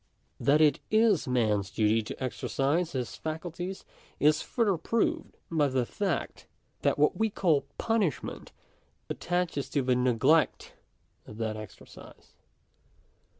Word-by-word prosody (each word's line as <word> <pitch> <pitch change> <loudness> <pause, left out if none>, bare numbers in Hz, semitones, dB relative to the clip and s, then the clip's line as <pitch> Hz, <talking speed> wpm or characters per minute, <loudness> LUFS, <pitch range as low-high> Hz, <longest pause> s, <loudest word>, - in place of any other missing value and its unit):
That 150 +2 +3
it 150 -2 +4
is 215 -7 +3
man's 110 -6 +1
duty 110 +2 +2
to 110 - -7
exercise 140 +6 -1
his 125 -3 -3
faculties 175 +4 -5 0.3
is 150 +1 +4
further 225 -6 +1
proved 230 - -1
by 155 -3 +3
the 130 -2 0
fact, 190 - -3 0.3
that - - +2
what 150 +1 +3
we 220 0 +2
call 165 -8 +1
punishment 220 - -1 0.6
attaches 175 -5 -2
to 140 -1 0
the 125 0 +2
neglect 125 +5 +2 0.5
of 105 - -10
that 110 -1 -2
exercise. 110 -3 -12
150 Hz, 120 wpm, -29 LUFS, 125-180 Hz, 0.6 s, it